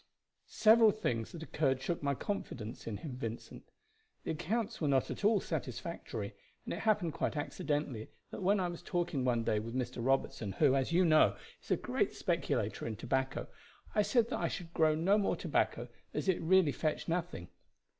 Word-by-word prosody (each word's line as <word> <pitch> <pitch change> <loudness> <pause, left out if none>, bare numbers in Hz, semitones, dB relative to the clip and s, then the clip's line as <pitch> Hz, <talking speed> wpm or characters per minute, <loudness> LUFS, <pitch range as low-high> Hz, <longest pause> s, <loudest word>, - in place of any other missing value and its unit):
"Several 220 0 +6
things 120 - -1
that 165 -2 -7
occurred 135 -5 0
shook 170 +5 -2
my 140 -1 0
confidence 125 - -5
in 105 -3 -3
him, 130 -2 -7
Vincent. 115 -2 -7 0.5
The - - -2
accounts 200 +8 -2
were 155 - +1
not 135 -2 +2
at - - -6
all 210 0 +5
satisfactory, - - -4 0.3
and - - -3
it - - -4
happened 210 -7 +1
quite 155 - -2
accidentally 145 -7 -2 0.2
that - - -6
when 195 +2 +3
I 180 - +1
was 175 -1 -6
talking 175 -7 -1
one 120 -2 +1
day 110 -1 +1
with 115 +3 -6
Mr. 125 -2 -2
Robertson, 120 -6 0
who, 130 +8 +4
as 135 +3 0
you 180 +2 +4
know, 155 -2 +5 0.2
is - - -18
a - - +3
great - - -1
speculator - - -1
in 110 - -3
tobacco, 130 +4 -1 0.5
I 210 - +4
said 235 +2 +2
that - - -1
I - - +1
should 170 -2 -6
grow 155 -1 +4
no 190 +7 +3
more 200 - +1
tobacco, - - 0 0.3
as - - -2
it 190 - +2
really 175 -2 +4
fetched 155 +1 -2
nothing. 165 - -2
155 Hz, 185 wpm, -33 LUFS, 130-185 Hz, 0.5 s, Several